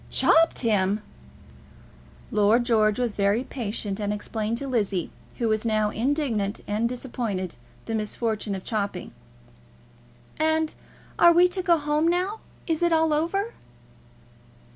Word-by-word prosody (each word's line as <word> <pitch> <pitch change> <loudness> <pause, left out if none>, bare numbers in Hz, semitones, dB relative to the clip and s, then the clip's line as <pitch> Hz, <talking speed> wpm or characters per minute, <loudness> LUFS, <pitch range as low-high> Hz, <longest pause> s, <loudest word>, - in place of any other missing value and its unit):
"Chopped 330 0 +3
him!" 210 -3 +1 1.3
Lord 215 +3 +3
George 215 -3 +2
was 245 -2 0
very 205 +4 +1
patient, 215 -5 -4
and 205 -1 -1
explained 215 +2 -3
to 275 - -4
Lizzie, 205 -8 -1 0.3
who 235 - 0
was 215 -1 +1
now 215 -2 +1
indignant 235 -5 -1
and 215 +3 0
disappointed, 235 -7 -4 0.3
the 225 - -4
misfortune 215 -1 -2
of 190 - -7
chopping. 200 -4 -3 1.3
"And 315 0 +1 0.5
are 345 - +8
we 350 +1 +6
to 370 +1 -1
go 345 -2 +3
home 300 +1 +1
now? 365 +5 0 0.3
Is 325 -1 -1
it 345 0 +3
all 320 -1 +3
over?" 390 +9 -1
230 Hz, 130 wpm, -25 LUFS, 210-315 Hz, 1.3 s, are